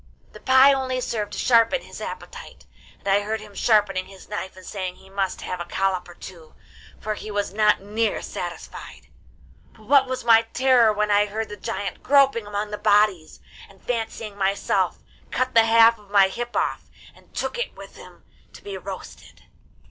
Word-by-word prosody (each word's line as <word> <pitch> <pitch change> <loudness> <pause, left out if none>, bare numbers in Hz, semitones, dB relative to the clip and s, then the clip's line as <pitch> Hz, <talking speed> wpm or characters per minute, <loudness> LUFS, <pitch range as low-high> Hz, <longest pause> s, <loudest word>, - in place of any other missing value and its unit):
The - - -13
pie 260 +2 +6
only 260 -1 -1
served 215 -4 -3
to - - -5
sharpen 230 - +3
his - - -11
appetite, 485 0 -9 0.3
and - - -13
I 195 +1 +4
heard 220 +2 -3
him 210 -1 -13
sharpening 195 -4 +2
his 195 -1 -14
knife 190 -3 -6
and 185 - -13
saying 185 -3 -5
he 190 - -19
must 195 -1 -2
have 180 - -5
a 175 - -4
collop 185 0 -1
or 175 - -13
two, 170 -4 -12 0.4
for 215 - -3
he 215 - -8
was 205 -2 -2
not 210 -1 +3
near 215 +3 -1
satisfied. - - -8 0.6
But 220 - -19
what 270 +3 +4
was 255 -2 -4
my 225 -1 +7
terror 240 0 +3
when 210 0 0
I 205 0 +4
heard 220 +1 -4
the 210 - -6
giant 195 -1 -5
groping 275 -6 +3
among 205 0 -3
the 210 - -5
bodies, 205 -6 +2 0.3
and, 195 -1 -19
fancying 225 -3 -4
myself, 195 0 0 0.3
cut 255 0 -1
the 230 -1 +6
half 230 0 +5
of 205 -1 -20
my 200 -1 +5
hip 240 +4 -6
off, - - -2 0.2
and - - -23
took 485 - -3
it 485 - -4
with - - -12
him - - -15 0.3
to - - -14
be 405 -1 -6
roasted. - - -10
210 Hz, 185 wpm, -23 LUFS, 195-230 Hz, 0.6 s, my